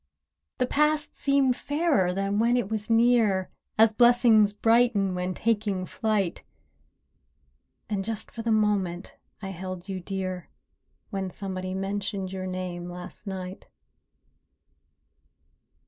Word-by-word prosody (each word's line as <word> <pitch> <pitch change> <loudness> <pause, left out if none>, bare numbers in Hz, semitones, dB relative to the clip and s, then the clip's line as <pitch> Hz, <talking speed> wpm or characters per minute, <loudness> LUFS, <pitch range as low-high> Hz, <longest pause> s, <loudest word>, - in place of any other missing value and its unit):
The 255 - +2
past 300 +3 +1
seemed 275 -2 +2
fairer 290 - +1
than 195 +2 -1
when 235 +2 +3
it 220 -4 -2
was 215 +1 -2
near, 225 -5 +3 0.3
As 220 0 +6
"blessings 235 -3 +5
brighten 225 -2 +3
when 180 0 -2
taking 205 -4 0
flight;" 205 -4 -1 1.4
And 200 -2 -2
just 220 0 -5
for 230 - -6
the 225 0 -1
moment 200 -5 0 0.3
I 195 - -4
held 185 0 -7
you 190 -1 -4
dear— 185 -1 -4 0.6
When 195 -2 -2
somebody 185 0 -5
mentioned 195 0 -3
your 185 -1 -4
name 180 -1 -5
last 180 +3 -9
night. 185 -1 -6
200 Hz, 115 wpm, -27 LUFS, 185-225 Hz, 1.4 s, As